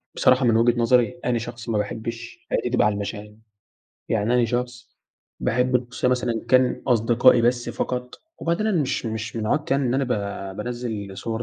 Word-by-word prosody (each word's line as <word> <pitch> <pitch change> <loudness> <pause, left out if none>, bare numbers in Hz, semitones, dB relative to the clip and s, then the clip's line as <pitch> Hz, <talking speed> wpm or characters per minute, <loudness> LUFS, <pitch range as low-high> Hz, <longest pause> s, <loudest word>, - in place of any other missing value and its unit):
بصراحة 130 0 +4
من 115 -2 +4
وجهة 120 +1 +3
نظري، 120 +6 +2
أنا 120 -1 +1
شخص 120 0 -7
ما 110 - +1
باحبش 115 +3 -5
حياتي - - 0
تبقى 125 - +2
على 105 - +2
المشاع، 105 +1 -6 0.8
يعني 110 +2 +1
أنا 125 -1 +4
شخص 120 +1 -4 0.5
باحب 125 +2 +2
الخصوصية 125 0 -2
مثلًا 120 -2 -1
كان 130 0 +3
أصدقائي 120 +1 +4
بس 120 +1 +1
فقط، 125 0 -3 0.2
وبعدين 170 +6 -1
أنا 185 -8 +2
مش 130 -3 -2
مش 110 +1 -4
من 110 - -2
عادتي 145 +2 +1
يعني 140 -2 +1
إن 120 - 0
أنا 135 +1 +1
ب - - -7 0.5
بانزِّل 110 -4 -5
صور 115 0 -3
120 Hz, 180 wpm, -23 LUFS, 115-125 Hz, 0.8 s, بصراحة